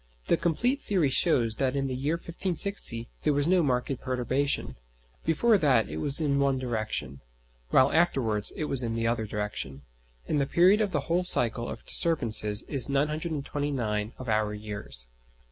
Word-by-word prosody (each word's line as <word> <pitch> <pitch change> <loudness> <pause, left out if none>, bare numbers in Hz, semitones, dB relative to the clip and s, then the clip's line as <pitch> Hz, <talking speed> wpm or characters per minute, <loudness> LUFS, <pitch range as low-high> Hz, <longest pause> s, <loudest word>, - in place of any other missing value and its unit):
The - - +5
complete 240 - 0
theory 175 -9 0
shows 120 -8 +2
that 135 -1 0
in 135 -1 -1
the 130 -1 -3
year 145 +5 -1
1560 170 - 0
there 150 - +1
was 145 +1 +1
no 185 0 +3
marked 130 -2 -1
perturbation: 130 +2 -2 0.5
before 210 +7 +3
that 130 - +2
it 75 - -6
was 135 - -1
in 140 -3 0
one 140 -1 +1
direction, 110 - -4 0.5
while 130 - +4
afterwards 120 -11 +1
it 155 - -3
was 135 -3 +1
in 115 -2 -2
the 115 0 -2
other 115 -1 -1
direction, 105 -11 -5 0.4
and 145 - 0
the 135 - -1
period 185 +7 +4
of 210 - 0
the 150 -5 -1
whole 175 +2 -1
cycle 120 -8 +3
of - - -9
disturbances 115 -10 +4
is 140 -2 -2
929 140 -7 -2
of 130 - -9
our 110 -1 0
years. 105 - -4
135 Hz, 165 wpm, -27 LUFS, 115-160 Hz, 0.5 s, The